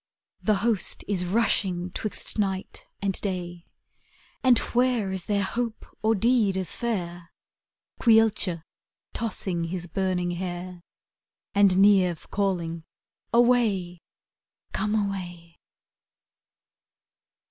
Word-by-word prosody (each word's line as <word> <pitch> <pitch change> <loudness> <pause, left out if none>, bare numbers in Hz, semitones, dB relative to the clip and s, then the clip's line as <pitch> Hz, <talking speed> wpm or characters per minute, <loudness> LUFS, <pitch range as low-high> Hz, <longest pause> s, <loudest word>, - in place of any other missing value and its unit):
'' - - -50
The 215 - +5
host 225 -5 +1
is 185 -3 0
rushing 185 -3 +1
Hwixt 215 0 -4
night 195 -2 -3 0.2
and 195 -2 -1
day; 175 -3 -4 0.8
And 255 -2 +6 0.2
where 245 -5 +2
is 190 -2 -5
there 200 -1 +1
hope 230 +2 -3 0.2
or 220 +1 +3
deed 220 -2 +2
as 185 -2 -3
fair? 175 -7 -3 0.7
Caolte 220 -7 +3 0.5
tossing 190 -6 -2
his 175 +1 -3
burning 180 0 -1
hair, 175 0 -5 0.7
And 200 -2 +4
Niamh 190 -4 +4
calling, 175 -5 -1 0.5
''Away, 230 -8 +2 0.7
come 215 0 0
away? 175 -5 -4
190 Hz, 100 wpm, -26 LUFS, 175-215 Hz, 0.8 s, And